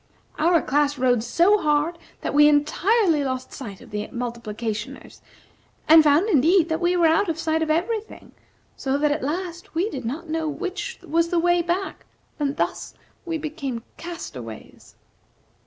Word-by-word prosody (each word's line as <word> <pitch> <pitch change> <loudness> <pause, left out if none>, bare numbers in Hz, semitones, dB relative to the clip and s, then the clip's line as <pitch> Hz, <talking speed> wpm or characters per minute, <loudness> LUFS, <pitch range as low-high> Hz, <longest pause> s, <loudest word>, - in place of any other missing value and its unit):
Our 335 +1 +3
class 290 +1 +1
rowed 250 -3 +2
so 350 - +3
hard 300 +2 +1 0.2
that - - -3
we 295 +1 +7
entirely 320 +3 +2
lost 260 -1 -4
sight 205 -8 -8
of - - -15
the 210 0 -3
Multiplicationers, 230 -2 -5 0.7
and 320 0 +8
found 305 +7 +4
indeed 335 - +4
that 320 +1 -1
we 355 +1 +2
were 340 - +4
out 325 +4 +3
of 325 - -1
sight 320 0 0
of 320 - -1
every 365 +8 +1
thing; 440 - -15 0.4
so 270 0 -1
that, 295 0 +2
at 295 - -1
last, 340 +3 -4
we 370 +7 0
did 260 -2 -5
not 290 +9 -5
know 320 0 -2
which 375 +5 -5
was 335 +1 +1
the 350 - 0
way 350 +1 +3
back, 350 +3 -3 0.3
and 285 -1 -1
thus - - -3 0.3
we 330 -1 -1
became 290 -6 -5
castaways." 125 - -9
315 Hz, 165 wpm, -23 LUFS, 275-345 Hz, 0.7 s, and